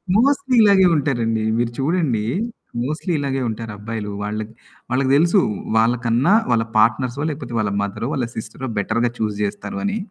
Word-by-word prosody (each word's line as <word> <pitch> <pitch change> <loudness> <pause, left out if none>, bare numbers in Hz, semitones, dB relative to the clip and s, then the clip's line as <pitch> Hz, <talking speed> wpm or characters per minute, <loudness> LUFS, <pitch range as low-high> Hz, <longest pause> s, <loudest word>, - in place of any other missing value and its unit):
Mostly 270 +3 +3
ఇలాగే 195 -2 +6
ఉంటారండి. 115 -6 0 0.2
మీరు 120 0 0
చూడండి 140 -6 +1 0.6
మోస్ట్‌లీ 155 +6 -3
ఇలాగే 135 -2 -1
ఉంటారు 110 0 -5
అబ్బాయిలు. 105 0 -5
వాళ్ళకి, 110 +1 -4 0.4
వాళ్ళకి 130 +1 +1
దెలుసు 170 +6 +4 0.4
వాళ్ళకన్నా 120 - +2 0.2
వాళ్ళ 115 -1 +3
పార్ట్నర్సో, 120 +5 +2
లేకపోతే 135 -5 -6
వాళ్ళ 105 -2 0
మదరో, 100 +3 -3
వాళ్ళ 130 -5 -1
సిస్టరో, 110 +4 -6
బెటర్‌గా 115 +4 0
చూజ్ 105 -2 -1
జేస్తారు 105 - -3
అని. 205 +2 0
120 Hz, 145 wpm, -21 LUFS, 110-150 Hz, 0.6 s, ఇలాగే